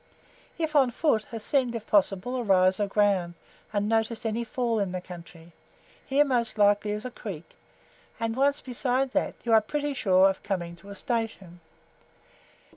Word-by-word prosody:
If 320 -2 -2
on 270 -3 +5
foot, 240 -3 0
ascend, 240 +2 0
if 225 -1 -5
possible, 205 +4 +1
a - - -1
rise 185 -3 +3
of 205 -1 0
ground, 195 -4 +1 0.4
and 205 -1 0
notice 225 +1 0
any 225 +1 -1
FALL 235 0 -1
in 195 -3 -1
the 185 - -2
country; 170 -2 -12 0.5
here, 285 +2 +3
most 240 -5 0
likely, 205 0 +3
is 210 +3 -3
a 255 - -4
creek, 190 -9 -8 0.6
and 230 0 -2
once 280 +2 +2
beside 255 +1 -1
that, - - 0
you 235 - +1
are 220 - +7
pretty 290 +6 -2
sure 190 -6 +4
of 195 -1 -2
coming 175 -4 -3
to 195 +4 -14
a 200 - -8
station. 215 -6 -4
220 Hz, 170 wpm, -27 LUFS, 195-245 Hz, 0.6 s, are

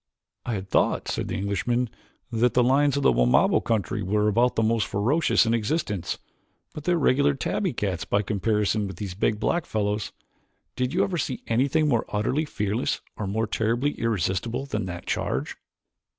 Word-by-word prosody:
"I 120 - 0
had 95 -1 -5
thought," - - +1
said - - -2
the - - -3
Englishman, 110 +5 0 0.4
"that 115 +1 +2
the 125 - +5
lions 140 +2 +3
of 140 - -1
the - - +6
Wamabo - - +3
country 110 -2 -1
were 105 +2 +1
about 120 +4 +2
the 110 - +2
most 110 -2 +1
ferocious 125 +10 +2
in 115 - +1
existence, 110 - -1 0.6
but 150 - -8
they 180 - +3
are - - +2
regular 140 -1 +3
tabby 185 +7 -1
cats 95 -7 -2
by 100 +1 0
comparison 105 +1 0
with 95 - -7
these 95 0 -5
big 105 +2 0
black 170 +9 0
fellows. 105 -1 -1 0.6
Did 125 0 -1
you 185 +4 +2
ever 180 -4 -1
see 130 -2 -3
anything 140 +7 +2
more 120 -6 +1
utterly 130 +9 0
fearless 105 -3 -2
or 105 - -4
more 110 +3 0
terribly 115 +6 0
irresistible 115 - -1
than 105 -7 -3
that 85 -1 -6
charge?" - - -2
115 Hz, 180 wpm, -25 LUFS, 105-135 Hz, 0.6 s, the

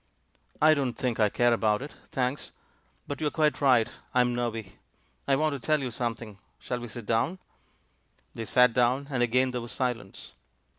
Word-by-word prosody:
"I 155 +1 +6
don't 135 -5 -1
think 125 -3 -2
I 105 -1 +4
care 120 +3 +3
about 110 0 +1
it, 145 - -9 0.2
thanks; 130 +2 -2 0.5
but 145 +2 -6
you're 150 - +1
quite 150 -1 +1
right 125 -5 +4 0.2
— - - -35
I'm 125 -1 +3
nervy. 115 -4 -4 0.5
I 135 - +4
want 155 +1 +1
to 140 - -4
tell 155 +5 +1
you 130 -3 -3
something. 115 -3 -4 0.2
ShaU 125 - -4
we 120 - -7
sit 115 0 -8
down?" 115 - 0 1.0
They 115 - -5
sat 125 +1 +4
down, 125 +4 +1
and 130 -3 0
again 125 +2 +2
there 125 -1 -3
was 120 - -6
silence. 125 -6 -4
125 Hz, 185 wpm, -28 LUFS, 115-135 Hz, 1.0 s, I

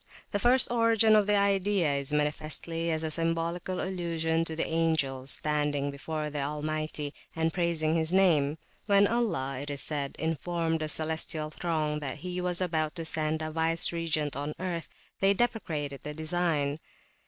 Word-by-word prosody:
The 205 - 0
first 245 +2 +4
origin 230 -2 +4
of 210 -1 +4
the 210 - +4
idea 200 -5 +2
is 140 0 -3
manifestly 155 +3 +1
a 160 - +1
symbolical 165 +3 -1
allusion 165 -3 -1
to 160 - -4
the 160 - 0
angels 155 -5 0
standing 145 -2 +1
before 150 +2 -4
the 145 -1 -2
Almighty 150 0 -3 0.2
and 165 0 0
praising 170 -3 +1
his 160 0 +1
name. 160 -6 +4 0.3
When 200 -1 +6
Allah, 195 - 0
it 145 - -6
is 140 -1 -4
said, 145 -3 -2
informed 165 +1 -1
the 155 -1 -2
celestial 155 0 -2
throng 155 -2 -1
that 140 -3 -4
he 180 0 -3
was 180 0 0
about 160 -3 0
to 165 -2 -4
send 155 0 0
a 155 - -3
vice 165 +1 +1
regent 160 -3 -1
on 145 +2 -3
earth, 175 -3 -3 0.3
they 195 +1 +4
deprecated 160 - -1
the 150 0 -6
design. 155 -3 0
160 Hz, 160 wpm, -29 LUFS, 150-175 Hz, 0.3 s, When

